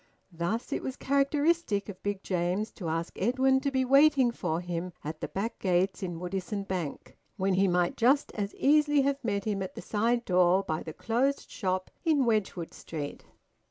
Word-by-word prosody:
Thus 175 +8 -2
it - - -1
was 260 - -4
characteristic 280 -4 +1
of 200 -3 -9
Big 200 -1 -3
James 180 +4 -1
to 175 -6 -5
ask 165 +1 -2
Edwin 260 +5 +3
to 280 - -1
be 260 -1 +1
waiting 275 -1 +5
for 170 -8 -2
him 175 0 -4
at 155 +1 -6
the - - -2
back 210 +4 -4
gates 185 +1 +1
in 175 -3 -4
Woodisun 195 +3 -4
Bank 175 -6 -4 0.2
when 190 -1 +1
he 195 +1 +3
might 175 -1 +1
just 265 +5 +3
as 205 -1 -3
easily 295 0 +4
have 275 0 0
met 200 -3 -1
him 205 -3 -1
at 190 - -5
the - - -6
side 235 +3 0
door 180 +1 +4
by 155 -3 -2
the 160 - -6
closed 255 - -1
shop 185 -3 -2
in 305 -6 +3
Wedgwood 210 -7 -1
Street. 150 -3 -7
200 Hz, 185 wpm, -29 LUFS, 180-260 Hz, 0.2 s, waiting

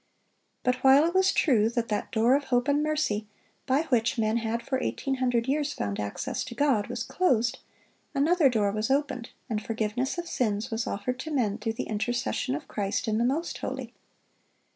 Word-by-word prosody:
But 250 0 +2
while 270 +3 +7
it 340 - 0
was 375 0 +4
true 225 -7 +3
that 235 -1 -2
that 210 - -2
door 230 +3 +3
of 280 0 +2
hope 245 0 +1
and 290 +1 +3
mercy 300 -9 0 0.4
by 270 +4 +3
which 240 0 +2
men 220 0 +1
had 230 0 -2
for 260 -1 -1
eighteen 270 -1 -2
hundred 245 -2 +1
years 290 +1 0
found 100 -1 -3
access 105 -1 -3
to 245 -2 -8
God, 265 -8 +2
was 240 -1 -3
closed, 245 -11 +1 0.6
another 305 +1 +4
door 210 -5 +1
was 215 +3 -2
opened, 265 -3 0 0.2
and 215 -2 -2
forgiveness 225 +6 -2
of 345 - -3
sins 215 -6 -1
was 225 +1 -2
offered 250 +5 -3
to 315 - -5
men 230 -7 0
through 225 +1 -2
the - - -3
intercession 245 +4 -1
of 300 -1 -7
Christ 205 +3 -2
in 220 0 +1
the - - +2
most 285 +8 -1
holy. - - -5
245 Hz, 190 wpm, -27 LUFS, 220-275 Hz, 0.6 s, while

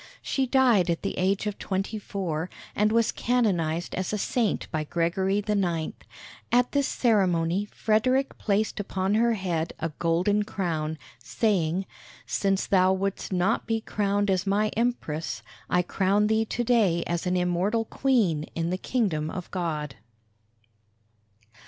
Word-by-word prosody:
She 270 -1 0
died 240 -9 +4
at 170 - -1
the - - -2
age 190 +3 +1
of 210 -1 -3
twenty 195 +3 -2
four, 180 -5 -3 0.3
and 210 +1 +2
was 230 0 +3
canonized 175 -9 0
as 185 - -2
a 210 - -1
saint 225 +1 0
by 155 -3 -1
Gregory 190 +6 0
IX. 175 -6 0 0.6
At 245 +1 +3
this 280 -1 +1
ceremony 190 -5 +2
Frederick 255 +6 +1
placed 210 +1 0
upon 190 -1 -1
her 230 +2 +3
head 170 -5 -2
a 165 - -1
golden 175 +5 +2
crown, 160 -6 -2 0.2
saying, 180 - 0 0.4
"Since 195 -1 0
thou 185 -1 +4
wouldst 195 +1 -3
not 185 +4 +1
be 225 -1 +1
crowned 205 -2 0
as 185 +1 0
my 210 +2 +2
Empress, 215 -10 -2 0.3
I 180 0 +3
crown 195 +3 +1
thee 220 +1 +2
to 240 +2 -2
day 210 -8 +3
as 170 +1 -2
an 180 0 +1
immortal 180 +6 +1
Queen 215 - +1
in 165 +1 -1
the 185 - -2
kingdom 180 -13 0
of 180 0 -6
God." 150 -7 -3
195 Hz, 145 wpm, -26 LUFS, 170-215 Hz, 0.6 s, died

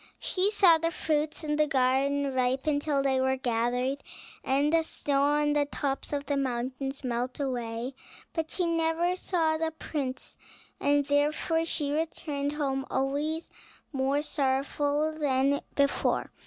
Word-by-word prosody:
She 380 +2 +2
saw 375 -6 +6
the 330 +1 +1
fruits 310 -1 -1
in 300 -1 -1
the 305 0 +3
garden 275 +1 +2
ripen 260 +4 +1
till 290 -2 0
they 265 -1 +2
were 265 0 +1
gathered, 250 +2 0 0.4
the 295 +5 +3
snow 285 -3 -1
on 295 +1 +3
the 295 -1 +2
tops 280 -1 -3
of 285 -1 -2
the 285 - 0
mountains 265 +1 -3
melt 250 +1 -2
away; 245 -2 -3 0.4
but 320 -1 -2
she 360 - 0
never 335 +1 +1
saw 325 -4 0
the 325 0 0
prince, 285 -4 -5 0.4
and 285 0 +2
therefore 300 +3 +1
she 295 -3 -2
returned 295 -2 -2
home, 270 -3 -1
always 290 +5 -1 0.4
more 275 +2 +1
sorrowful 290 +2 0
than 275 -1 +2
before. 280 0 +1
285 Hz, 140 wpm, -28 LUFS, 265-310 Hz, 0.4 s, saw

